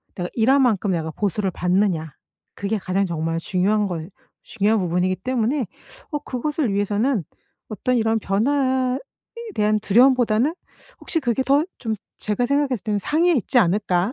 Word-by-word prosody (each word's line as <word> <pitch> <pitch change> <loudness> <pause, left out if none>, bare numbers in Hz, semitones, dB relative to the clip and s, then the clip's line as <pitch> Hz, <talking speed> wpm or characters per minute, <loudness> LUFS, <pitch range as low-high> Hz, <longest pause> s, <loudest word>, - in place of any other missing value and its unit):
내가 175 -1 -3
일한 260 +5 +3
만큼 215 -6 +2
내가 160 -3 -2
보수를 195 +2 -1
받느냐? 180 -4 0 0.4
그게 200 +3 -2
가장 195 0 0
정말 165 -1 -2
중요한 200 +4 +1
거 165 -4 -4 0.4
중요한 215 +1 +1
부분이기 180 +1 0
때문에 250 - -1 0.5
어 295 - -1
그것을 280 -2 -2
위해서는 205 +3 0 0.5
어떤 250 +3 -1
이런 225 0 +1
변화에 260 +5 +1 0.6
대한 210 0 +2
두려움보다는 245 +4 +3 0.5
혹시 330 - -1
그게 255 -3 0
더 280 +3 +3
좀 225 -3 -3 0.2
제가 215 +3 -1
생각했을 275 -4 0
때는 210 -2 0
'상위에 325 - +2
있지 250 - +2
않을까?' 190 0 +1
215 Hz, 335 characters per minute, -22 LUFS, 190-255 Hz, 0.6 s, 일한